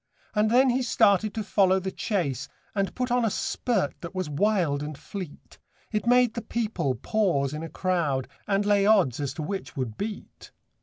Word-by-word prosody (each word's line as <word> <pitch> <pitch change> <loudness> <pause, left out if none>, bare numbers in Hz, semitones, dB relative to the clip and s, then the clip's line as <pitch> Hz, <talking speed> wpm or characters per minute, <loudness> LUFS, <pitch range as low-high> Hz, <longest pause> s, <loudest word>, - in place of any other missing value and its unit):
And 210 0 +2
then 255 +3 +5
he 255 +2 +1
started 215 -3 +3
to 220 - -2
follow 190 -2 +3
the 190 0 -4
chase, 140 - -2 0.2
And 195 -2 -1
put 250 -1 -2
on 245 0 +3
a 225 - +3
spurt 205 - -1
that 170 +2 -8
was 185 -5 -2
wild 170 -4 +1
and 150 -1 -5
fleet, 185 -4 -9 0.3
It 215 +1 -1
made 245 -1 +5
the 235 - -4
people 210 - -1
pause 145 - 0
in 155 - -4
a 165 - -6
crowd, 165 -9 0 0.2
And 200 0 +1
lay 205 -1 +3
odds 185 - +4
as 140 -2 -2
to 155 - -4
which 190 -1 -5
would 120 -5 -3
beat. 210 0 -6
195 Hz, 190 wpm, -26 LUFS, 150-215 Hz, 0.3 s, then